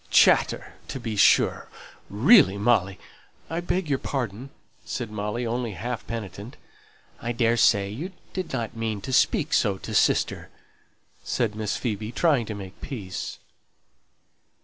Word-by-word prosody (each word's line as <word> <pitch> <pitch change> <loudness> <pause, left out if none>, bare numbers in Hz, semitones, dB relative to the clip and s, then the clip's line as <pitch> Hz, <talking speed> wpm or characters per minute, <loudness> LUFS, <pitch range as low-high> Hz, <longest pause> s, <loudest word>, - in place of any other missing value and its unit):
'Chatter' - - +4
to 135 - -5
be 115 -3 -4
sure. 100 - +4 0.4
Really, 115 - +6
Molly 100 -3 +2 0.3
" - - -33
"I 165 - -1
beg 175 0 -1
your 140 -2 0
pardon," 125 -1 -4 0.3
said 120 -4 -5
Molly, 105 +3 -3
only 120 -1 -2
half 120 +6 -5
penitent. 110 0 -7 0.6
"I 120 - -2
daresay 115 -4 +3
you 160 - -5 0.2
did 185 -2 -4
not 120 -3 -3
mean 110 -3 -3
to 130 - -5
speak - - +2
so 100 -2 +2
to - - -7
sister," - - +2 0.7
said 115 -4 -1
Miss 105 -1 -2
Phoebe, 110 -2 -3
trying 140 -5 +2
to 105 - -4
make 95 -2 -10
peace. 100 -10 -6
115 Hz, 140 wpm, -25 LUFS, 105-125 Hz, 0.7 s, Really